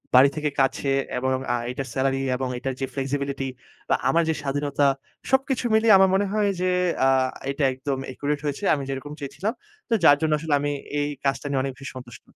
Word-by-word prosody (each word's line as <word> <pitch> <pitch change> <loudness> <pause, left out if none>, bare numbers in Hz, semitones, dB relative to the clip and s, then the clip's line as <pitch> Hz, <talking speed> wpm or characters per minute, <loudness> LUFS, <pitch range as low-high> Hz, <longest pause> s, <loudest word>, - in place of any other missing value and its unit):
বাড়ি 130 +2 +8
থেকে 150 -1 -1
কাছে 135 +1 +1 0.3
এবং 130 +1 0 0.2
আ - - +2 0.2
এটার 135 +1 -5
সেলারি 135 0 +1 0.2
এবং 130 +1 -2
এটার 135 +2 -3
যে, - - +1
ফ্লেক্সিবিলিটি 140 0 -2 0.4
বা - - +4
আমার 170 +1 +3
যে, - - +3
স্বাধীনতা 145 0 0 0.5
সবকিছু 265 -2 +1
মিলিয়ে 220 -1 +6
আমার 190 0 +5
মনে 200 +1 +2
হয় 210 -1 +2
যে, 185 - +2 0.4
আ - - +5 0.4
এটা 140 +1 -2
একদম 135 +1 -3
অ্যাকুরেট 145 +3 -2
হয়েছে। 145 +6 -3
আমি 140 -2 -1
যেরকম 135 +2 -5
চেয়েছিলাম। 185 +10 -3 0.4
তো - - +1
যার 145 -3 +8
জন্য 160 -1 +1
আসলে 160 -1 -2
আমি 145 +1 -1 0.3
এই 145 - 0 0.2
কাজটা 135 0 0
নিয়ে 135 -2 +1
অনেক 135 -1 -3
বেশি 135 - -7
সন্তুষ্ট। 120 -2 -11
140 Hz, 195 wpm, -24 LUFS, 135-160 Hz, 0.5 s, বাড়ি